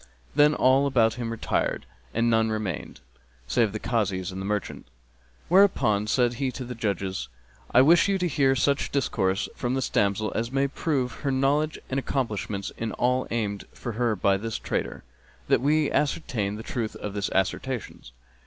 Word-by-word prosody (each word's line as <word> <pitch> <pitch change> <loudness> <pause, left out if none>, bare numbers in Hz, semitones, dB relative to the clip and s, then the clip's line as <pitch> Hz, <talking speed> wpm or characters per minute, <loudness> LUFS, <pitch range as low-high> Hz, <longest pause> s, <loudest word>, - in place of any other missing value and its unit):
Then 150 +1 +5
all 135 +2 +4
about 115 -5 +3
him 115 0 -4
retired, 115 -1 -1 0.3
and 115 +1 +1
none 115 -1 +3
remained 105 -7 -4 0.4
save 105 - +2
the 110 - -3
Kazis 100 -7 -1
and 95 +1 -6
the 95 - -4
merchant, 105 -2 -3 0.6
whereupon 135 - +4
said 120 +1 +2
he 135 - +1
to 130 - -6
the 125 - -5
judges, 95 - -2 0.4
"I 130 - +6
wish 170 +6 +5
you 200 -1 +2
to 180 -1 0
hear 135 -4 +2
such 140 +2 +1
discourse 100 -7 0
from 125 +1 -1
this 135 -1 -1
damsel 100 +2 +1
as 115 +2 -2
may 135 +1 +2
prove 140 -3 -1
her 140 - -1
knowledge 140 +3 +1
and 135 - -1
accomplishments 105 -7 -2
in 115 -1 -3
all 125 +1 +1
aimed 105 -4 -2
for 120 - -5
her 115 0 0
by 100 0 +2
this 115 +2 -4
trader, - - -3 0.5
that - - +4
we 150 +2 +2
ascertain 120 -9 -1
the 110 - -7
truth 115 -3 -3
of 105 - -6
his 100 -1 -2
assertions." 95 - -2
120 Hz, 170 wpm, -26 LUFS, 105-135 Hz, 0.6 s, I